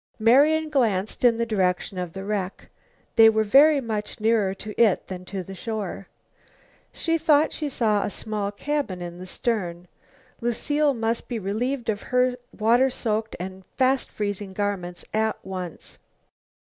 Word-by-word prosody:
Marian 290 +8 +4
glanced 220 -10 0
in 235 -2 +5
the 235 - 0
direction 190 -3 0
of 175 -2 -4
the 195 - -6
wreck. 195 -2 -4 0.5
They 225 -1 +9
were 220 0 +2
very 280 +7 +6
much 220 -4 -4
nearer 215 -3 +2
to 210 +2 -8
it 215 -5 +4
than 185 -1 -6
to 190 0 -5
the 195 - -9
shore. 200 -2 -5 0.8
She 330 -1 -1
thought 310 -1 +3
she 300 -2 -3
saw 215 -6 +1
a - - -1
small 205 -1 -3
cabin 275 -3 -2
in 175 0 -7
the 185 - -8
stern. 180 -5 -2 0.5
Lucile 285 +5 +1
must 230 0 -1
be 240 - -3
relieved 230 +5 -2
of 210 -2 -1
her 250 0 +2 0.2
water 235 +5 +3
soaked 220 -3 -2
and 190 +1 -7
fast 260 0 +2
freezing 205 -2 -4
garments 190 -3 -3
at 220 0 +1
once. 185 -3 -7
215 Hz, 155 wpm, -24 LUFS, 195-250 Hz, 0.8 s, They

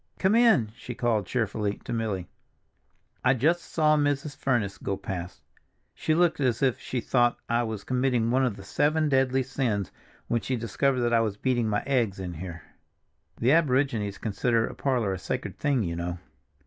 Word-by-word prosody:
"Come 190 +2 +2
in," 225 - +4
she 120 +1 -8
called 115 -5 0
cheerfully 105 -4 -1
to 120 - -5
Milly. 105 -6 -2 1.0
"I 130 +1 +4
just 165 +8 +2
saw 155 -2 +2
Mrs. 145 0 0
Furniss 120 -8 -1
go 100 - -2
past; 90 -2 -6 0.5
she 155 - 0
looked 175 -2 +3
as 125 -3 +1
if 130 -3 +2
she 130 - -3
thought 120 0 +2
I 120 +1 +2
was 110 -4 -4
committing 125 -3 +1
one 130 +2 +3
of 125 -6 0
the 95 - -11
seven 155 +7 +1
deadly 130 -1 +2
sins 120 -7 -2 0.4
when 115 -1 0
she 130 - -2
discovered 125 +3 0
that 120 0 +1
I 115 - +5
was 105 -3 -1
beating 120 -2 0
my 105 -1 0
eggs 120 -8 0
in 90 -2 -5
here. 85 -1 -7 0.7
The 120 +3 +2
aborigines 130 -9 +2
consider 115 +2 0
a - - -6
parlor 120 -8 0
a 95 - -4
sacred - - -4
thing, 140 -5 +1
you 85 -2 -3
know. 85 +1 -3
120 Hz, 180 wpm, -27 LUFS, 105-135 Hz, 1.0 s, I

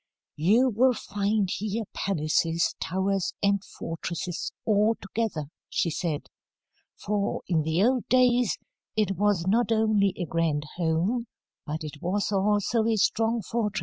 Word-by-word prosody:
'You 215 - +4
will 250 +3 +3
find 205 0 0
here 215 +3 -2
palaces, 165 -2 +1
towers, 190 +1 -1
and 200 -1 +2
fortresses, 170 0 -5
all 215 +1 +3
together,' 195 -9 -3 0.2
she 170 - 0
said. 155 -2 -2 0.7
'For, 205 0 -2
in 165 -3 +2
the 160 +5 +1
old 250 +1 +2
days, 250 -2 +4 0.4
it 210 -3 +2
was 200 -2 +1
not 230 +5 +2
only 215 -3 +3
a 175 - -2
grand 160 -2 0
home, 180 +8 0 0.4
but 155 +2 -3
it 150 -1 -8
was 200 +4 -1
also 210 +3 +2
a 225 - +2
strong 225 +2 +1
fortress.'" 215 +1 -1
200 Hz, 135 wpm, -27 LUFS, 170-220 Hz, 0.7 s, You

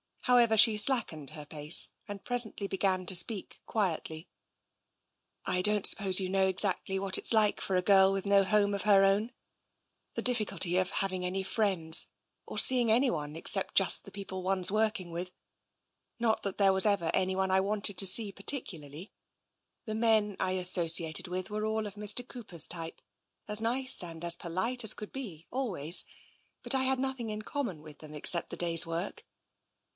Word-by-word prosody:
However, 240 -3 +2
she 220 0 +5
slackened 210 - 0
her 150 -1 -9
pace 150 +2 +3 0.2
and 205 -1 -10
presently 235 -5 0
began 190 -1 -2
to 190 - -1
speak 190 +3 -3
quietly. 165 -5 -4 0.6
" - - -51
I - - 0
don't 210 +1 0
suppose 195 -2 +4
you 185 -1 -4
know 190 0 0
exactly 190 0 +2
what 195 -1 0
it's - - -1
like 215 -2 +2
for 190 - -4
a 180 - +1
girl 195 0 +4
with 195 0 -4
no 200 0 +2
home 205 +1 0
of 200 - -4
her 200 -2 +3
own 200 +4 0 0.4
— - - -50
the - - -4
difficulty 215 -7 +2
of 185 0 -1
having 190 -2 -4
any 190 +1 -4
friends, 190 -6 +2 0.4
or - - -9
seeing 245 -3 +5
anyone 170 - -1
except 190 +4 +3
just 195 - +2
the 195 - -11
people 195 -2 -8
one's 185 0 -2
working 215 -4 -2
with 175 +2 -7 0.5
— - - -52
not 225 -2 -2
that 200 - -5
there 195 -2 +3
was 190 +2 +4
ever 200 -6 0
anyone 190 0 -1
I 190 - +2
wanted 205 0 -2
to 195 - +2
see 205 +2 +2
particularly, 180 - -6 0.7
the 215 -2 -6
men 220 -2 0
I 185 - -2
associated 175 -1 +3
with 180 +1 -6
were 215 0 -4
all 220 0 -3
of 205 -1 -9
Mr. 210 +4 +2
Cooper's 200 - -3
type, 165 -1 -6 0.5
as 210 0 +4
nice 250 0 +2
and 165 -1 -10
as 170 0 +7
polite 225 +9 -4
as 220 - +2
could 210 - -10
be, 190 - -9
always 185 - +3 0.3
— - - -42
but - - +5
I 265 -1 0
had 265 0 -1
nothing 265 -3 -4
in 215 0 -6
common 225 - -6
with 155 -2 -14
them 155 -1 -12
except 170 +3 +1
the - - -7
day's 170 -1 +1
work. 175 - -6
195 Hz, 185 wpm, -28 LUFS, 180-215 Hz, 0.7 s, as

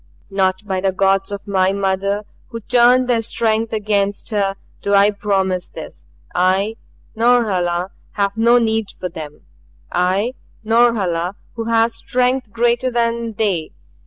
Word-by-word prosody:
"Not 190 0 0
by 190 -2 -2
the 195 0 +1
gods 195 +1 +1
of 200 +1 -6
my 190 -1 +2
mother 200 +1 -1 0.2
who 230 -2 -7
turned 245 +2 +4
their 240 -2 +2
strength 225 0 0
against 205 -1 -1
her 200 -2 0 0.3
do 200 0 +1
I 200 +1 +5
promise 195 -3 -1
this. - - -10 0.3
I, 190 +5 +1 0.4
Norhala, 195 -7 +1 0.2
have 200 -1 0
no 235 +2 +4
need 225 -2 +1
for 180 - -3
them 150 -3 -9 0.5
I, 190 +7 +1 0.3
Norhala, 205 -6 +2 0.2
who 230 -1 -5
have 230 0 +2
strength 250 -1 -1
greater 240 +2 +1
than 235 -1 -1
they. 195 -7 -1
205 Hz, 135 wpm, -19 LUFS, 190-230 Hz, 0.5 s, I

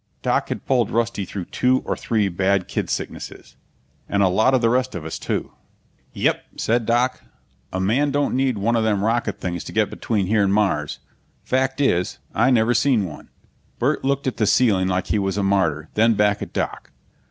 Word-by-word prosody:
Doc - - 0
had - - -5
pulled 125 -5 +2
Rusty 115 -3 -1
through 95 -2 -6
two 130 +6 +1
or - - -1
three 110 -3 0
bad 95 +1 0
kid - - -3
sicknesses - - -6 0.5
and 100 0 +2
a 95 - +4
lot 110 +8 +3
of 130 - +2
the 115 - +3
rest 130 -1 0
of 85 -4 -6
us, 80 - -5
too. - - -3 0.6
"Yep," - - 0
said 115 0 0
Doc. 120 +2 +1 0.5
"A 95 - -3
man 120 +10 +2
don't 145 +1 0
need 130 -3 +1
one 115 +4 +1
of 115 - +2
them 105 -3 +1
rocket 115 -1 0
things 85 -2 -4
to - - -7
get - - +1
between 105 -5 -1
here 105 +2 +2
and 100 - +2
Mars. 85 -8 0 0.5
Fact 130 +1 0
is, 90 -11 +1 0.2
I 120 +5 +3
never 120 -2 +3
seen 120 -4 +2
one." 75 -4 -10 0.5
Burt 140 +5 0
looked 140 +1 0
at 130 - -2
the 110 -2 +1
ceiling 100 -4 +3
like 95 0 0
he 105 - 0
was 95 0 -1
a 100 - 0
martyr, 85 -6 +1
then 115 +1 +3
back 105 0 +2
at - - -6
Doc. - - -3
110 Hz, 200 wpm, -22 LUFS, 95-125 Hz, 0.6 s, a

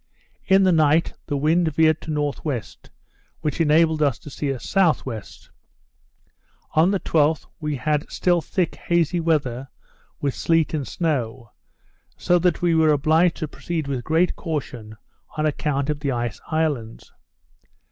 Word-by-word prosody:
In 195 0 +5
the 185 - +4
night 155 0 +3
the 145 - -1
wind 160 +2 +1
veered 160 0 +3
to - - -9
N.W. 145 -3 -2 0.8
which 155 +1 -1
enabled 160 0 +3
us 140 -5 +2
to 145 - -12
steer 135 0 -2
S.W. 135 - 0 1.5
On 160 +4 +4
the 195 -1 +1
12th 155 -2 +1
we 150 -2 -2
had 150 +3 -1
still 175 -2 +1
thick 180 +1 -1
hazy 170 0 0
weather, 135 -6 0 0.5
with 140 -2 -1
sleet 165 0 +1
and 145 -4 -2
snow; 130 -8 -2 0.7
so 175 0 +2
that 175 0 0
we 175 -1 +3
were 160 -1 +4
obliged 160 +4 +3
to 155 - -4
proceed 160 0 -4
with 130 -3 -3
great 165 +5 +1
caution 125 -9 -5 0.4
on 155 - 0
account 145 -2 -1
of 150 - -4
the 140 -2 -1
ice 120 -3 -3
islands. 145 -8 -2
155 Hz, 145 wpm, -23 LUFS, 140-165 Hz, 1.5 s, In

